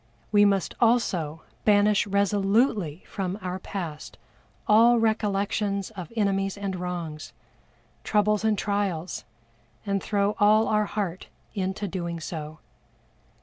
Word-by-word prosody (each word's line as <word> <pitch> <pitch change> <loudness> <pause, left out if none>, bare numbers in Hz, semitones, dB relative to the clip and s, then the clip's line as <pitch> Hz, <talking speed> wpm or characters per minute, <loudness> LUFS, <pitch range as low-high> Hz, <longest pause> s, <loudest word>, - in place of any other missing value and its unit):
We 205 -1 +6
must 195 -3 +1
also 180 -10 +1 0.2
banish 205 -1 +4
resolutely 200 - +1
from 190 -1 -3
our 185 -1 -4
past 170 -6 -6 0.5
all 230 +3 +6
recollections 205 -2 0
of 180 -4 -8
enemies 195 -2 0
and 200 -2 -3
wrongs, 175 -4 -5 0.7
troubles 210 0 +2
and 220 -1 +2
trials, 195 -5 -2 0.6
and 200 -1 0
throw 205 0 0
all 215 +2 +5
our 210 0 +2
heart 195 -4 -4 0.3
into 190 +1 -2
doing 170 -2 -4
so. 155 -1 -6
200 Hz, 110 wpm, -26 LUFS, 180-210 Hz, 0.7 s, We